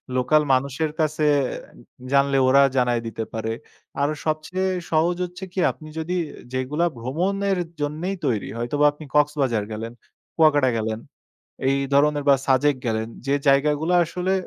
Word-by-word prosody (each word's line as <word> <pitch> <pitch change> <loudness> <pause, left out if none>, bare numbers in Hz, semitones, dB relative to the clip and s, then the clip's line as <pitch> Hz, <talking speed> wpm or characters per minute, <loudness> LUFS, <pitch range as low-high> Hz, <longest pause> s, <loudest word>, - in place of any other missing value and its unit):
Local 130 +5 +3
মানুষের 140 +4 0
কাছে 155 0 +1 0.9
জানলে 140 0 +3
ওরা 140 +2 +6 0.2
জানায় 120 -2 +2
দিতে 115 0 -4
পারে। 110 0 -3 0.5
আরো 145 +2 +1
সবচেয়ে 160 +5 -1 0.2
সহজ 165 +2 +2
হচ্ছে 180 +2 -10
কি, 190 - -3
আপনি 155 - -13
যদি 175 +3 -2 0.4
যেগুলা 145 +6 0
ভ্রমণের 190 +10 -1 0.2
জন্যই 160 +7 -2
তৈরি। 115 -7 0
হয়তোবা 145 +5 0
আপনি 150 +1 -12
কক্সবাজার 140 -7 +2
গেলেন, 110 +2 -5 0.4
কুয়াকাটা 145 -5 +4
গেলেন, 110 0 -2 0.7
এই 135 - +2 0.2
ধরনের 145 0 +3
বা 140 - +7
সাজেক 140 +2 +3
গেলেন। 110 0 -1 0.2
যে 140 - +3
জায়গা 140 +2 +4
গুলা 175 +2 +1
আসলে 180 +3 -2
145 Hz, 140 wpm, -23 LUFS, 130-160 Hz, 0.9 s, বা